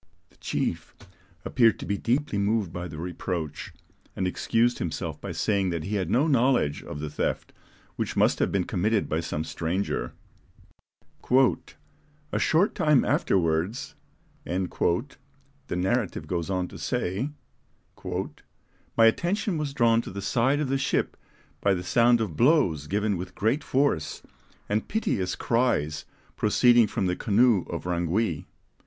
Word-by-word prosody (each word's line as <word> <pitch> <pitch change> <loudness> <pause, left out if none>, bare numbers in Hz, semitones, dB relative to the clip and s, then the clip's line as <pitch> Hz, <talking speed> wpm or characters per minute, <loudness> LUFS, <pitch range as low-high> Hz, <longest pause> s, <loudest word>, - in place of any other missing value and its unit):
The - - -26
chief - - -3 0.5
appeared 115 -3 +3
to - - -7
be 100 - -1
deeply 120 0 0
moved 100 -3 0
by 90 0 -4
the 80 -2 -9
reproach, 85 -2 -4 0.4
and 95 - -1
excused 115 +6 +1
himself 85 - -4
by - - -5
saying 100 -3 0
that 85 -3 -3
he 100 - -4
had 95 -5 -1
no 125 +8 +3
knowledge 125 - +2
of 75 - -7
the 75 0 -4
theft, - - -2 0.4
which - - -2
must - - +3
have - - +1
been 95 -2 +1
committed 105 +3 0
by 80 - -1
some 80 -2 -3
stranger. 85 +5 -2 2.2
"A - - 0
short 175 +6 +3
time 150 -4 +3
afterwards," 85 +5 0 0.5
the 90 +1 -1 1.1
narrative 95 +4 -1
goes 85 -1 -3
on 90 -2 -1
to - - -10
say, 100 +11 -2 0.7
"my 115 - -3
attention 175 - +1
was 150 -2 -2
drawn 115 -2 +4
to - - -8
the 100 +1 -6
side 120 +8 +2
of 150 -3 -1
the 135 0 +1
ship 140 - 0 0.5
by 100 -1 +3
the 90 - -4
sound 120 +5 +4
of 105 -8 -2
blows 115 - +3
given 105 +1 0
with 90 +1 -7
great 115 +9 0
force, 130 - 0 0.4
and 105 +2 -1
piteous 95 - -1
cries 95 - 0 0.3
proceeding 120 +1 +4
from 100 - -2
the 90 0 0
canoe 110 -1 +3
of 85 - -4
Rangui. 90 +1 -1
100 Hz, 145 wpm, -26 LUFS, 90-120 Hz, 2.2 s, drawn